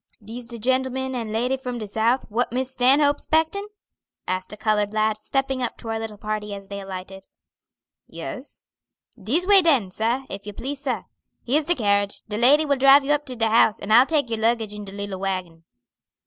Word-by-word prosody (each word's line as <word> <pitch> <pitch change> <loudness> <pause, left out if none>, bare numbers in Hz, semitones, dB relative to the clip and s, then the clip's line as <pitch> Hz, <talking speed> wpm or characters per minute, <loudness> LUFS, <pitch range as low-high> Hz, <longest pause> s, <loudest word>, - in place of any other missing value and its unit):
"Dis 230 +3 -8
de 235 -1 -6
gentleman 260 +2 0
and 230 -4 -4
lady 245 +4 0
from 250 -2 -5
de 215 -2 -5
South, 225 +5 +1
what 230 +3 -1
Miss 260 +1 -2
Stanhope's 275 +3 +3
'spectin'?" 320 +6 0 0.6
asked 185 0 -3
a 210 - -8
colored 210 -1 0
lad, 215 0 +1
stepping 270 +3 -1
up 245 - -2
to 225 - -9
our 225 0 -2
little 220 -2 -6
party 210 -1 -4
as 195 0 -11
they 200 0 -5
alighted. 190 0 -8 0.8
"Yes." - - -7 0.6
"Dis 285 - +1
way 400 0 +7
den, 270 - +2
sah, 235 +7 -1
if 200 +1 -8
you 210 - -6
please, 275 +6 -6
sah. 270 -3 -2 0.4
Here's 290 +5 +1
de 345 +3 +1
carriage. 200 -3 0
De 210 -1 -4
lady 290 +6 +5
will 285 -2 +1
drive 275 +1 +6
you 290 - 0
up 295 0 +1
to 255 - -5
de 225 -1 +1
house, 220 -2 +4
and 215 - -1
I'll 245 +4 +7
take 290 -7 +1
your 225 - -1
luggage 225 -1 0
in 210 0 -7
de 195 - -9
little 200 -1 -5
wagon." 185 -4 -4
230 Hz, 205 wpm, -23 LUFS, 210-265 Hz, 0.8 s, way